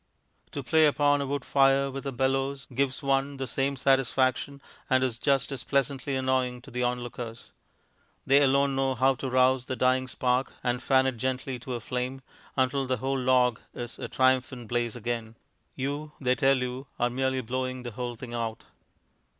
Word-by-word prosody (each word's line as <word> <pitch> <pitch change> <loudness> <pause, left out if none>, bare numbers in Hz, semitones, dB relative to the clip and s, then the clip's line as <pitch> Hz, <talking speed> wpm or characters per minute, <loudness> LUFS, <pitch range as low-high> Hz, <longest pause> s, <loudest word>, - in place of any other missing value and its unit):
To 140 - -4
play 155 +5 +5
upon 145 0 +3
a 140 - -2
wood 140 -1 -3
fire 135 0 +3
with 135 +1 -6
a - - -1
bellows 135 +1 0
gives 135 +2 0
one 135 +1 +1
the 135 - -3
same 135 +3 -1
satisfaction, 135 +1 +1 0.3
and 130 0 +3
is 120 -3 -1
just 140 0 +1
as 135 -3 -5
pleasantly 140 0 0
annoying 130 -1 0
to 135 - -13
the 125 +1 -3
onlookers. 120 -1 -4 0.7
They 140 +1 +5
alone 140 0 +3
know 135 -1 +1
how 130 +2 +4
to 130 +1 -5
rouse 130 0 +3
the 130 - -2
dying 130 0 +2
spark 125 +1 0
and 125 0 0
fan 130 0 +3
it 130 -2 -1
gently 130 +1 -2
to 125 +1 -5
a - - -3
flame, 125 +3 -3 0.4
until 130 +1 +1
the 130 0 0
whole 135 +3 -1
log 125 -2 +3 0.2
is 120 0 -6
a - - -4
triumphant 130 -2 +1
blaze 120 -1 -1
again; 115 -1 -4 0.4
you, 145 +3 -4
they 125 -2 +2
tell 135 +2 +3
you, 125 +1 -4
are 120 0 +1
merely 130 +1 0
blowing 130 +1 -3
the 120 - -5
whole 120 +2 -4
thing 120 +1 -8
out. 115 -1 -3
130 Hz, 180 wpm, -28 LUFS, 125-135 Hz, 0.7 s, play